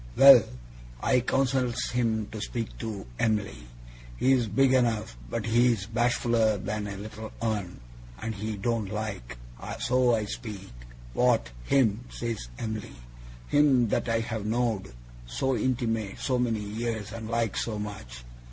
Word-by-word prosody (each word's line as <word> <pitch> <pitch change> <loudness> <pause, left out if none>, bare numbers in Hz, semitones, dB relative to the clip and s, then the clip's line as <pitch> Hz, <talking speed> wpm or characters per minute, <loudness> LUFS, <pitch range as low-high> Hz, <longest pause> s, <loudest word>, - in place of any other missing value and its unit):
'Well! 135 -3 +10 0.6
I 125 - +4
counsels 130 -1 0
him 115 -3 +1
to 110 - -6
speak 115 0 -4
to 110 - -5
Em'ly. 105 - -1 0.5
He's 130 - +3
big 130 +5 +3
enough, 115 - +1
but - - -2
he's 115 -3 +3
bashfuller 115 -1 +2
than 105 +1 -3
a 100 -1 -5
little 110 +2 -7
un, 105 -6 -2 0.4
and 110 - -3
he 105 0 -4
don't 110 0 -1
like. 105 - -4 0.4
So 125 -1 +3
I 110 -1 -1
speak. 105 -3 -7 0.4
"What! - - +2
Him!" 120 - +2
says 115 - -4
Em'ly. 110 -2 -5 0.5
"Him 135 -6 +4
that - - 0
I've 115 -1 -1
know'd 110 -3 -1 0.4
so 130 - 0
intimate 115 -4 -1
so 130 -2 0
many 115 -3 0
years, 110 0 -3
and 110 -1 -6
like 115 -2 0
so 110 -2 -2
much. 100 - -7
110 Hz, 135 wpm, -28 LUFS, 105-120 Hz, 0.6 s, Well